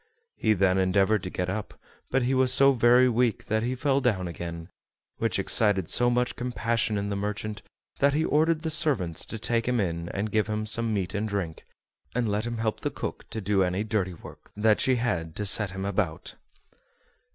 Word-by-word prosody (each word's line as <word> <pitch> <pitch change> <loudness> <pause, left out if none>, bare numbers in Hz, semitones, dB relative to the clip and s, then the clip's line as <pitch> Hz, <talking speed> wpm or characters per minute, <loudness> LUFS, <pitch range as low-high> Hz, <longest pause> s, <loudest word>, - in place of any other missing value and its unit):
He 110 - +2
then 95 -1 +2
endeavored 95 +2 +2
to 90 - -5
get 90 0 -3
up, 100 +3 -4 0.3
but 130 0 +1
he 125 +2 +1
was 130 -1 +4
so 135 +1 +6
very 125 0 +5
weak 120 -2 +1
that 110 +1 0
he 125 +3 -1
fell 140 +1 +1
down 100 -8 0
again, 85 0 -7 0.5
which - - 0
excited 100 -6 +2
so 120 0 +3
much 125 0 0
compassion 115 -2 -1
in 100 0 -2
the 100 - -2
merchant 105 +1 -4 0.4
that 140 0 +3
he 160 +2 +1
ordered 160 +2 +2
the 160 - 0
servants 135 - 0
to 110 - -5
take 115 +2 -1
him 125 -1 +1
in 85 -3 -2
and 105 +2 -3
give 110 0 +1
him 110 0 -2
some 115 +1 0
meat 95 -2 -2
and 105 +1 -2
drink, 90 -6 -4 0.5
and 125 -2 +1
let 105 +2 -1
him 120 0 -4
help 110 -1 -2
the - - -2
cook - - -6
to 110 - -5
do 100 0 +1
any 90 +2 0
dirty 100 -5 -1
work - - -14
that 105 0 +3
she 130 - +3
had 90 -10 -2
to 105 - -3
set 105 0 +4
him 95 +1 -5
about. 95 -5 -2
110 Hz, 205 wpm, -27 LUFS, 95-120 Hz, 0.5 s, so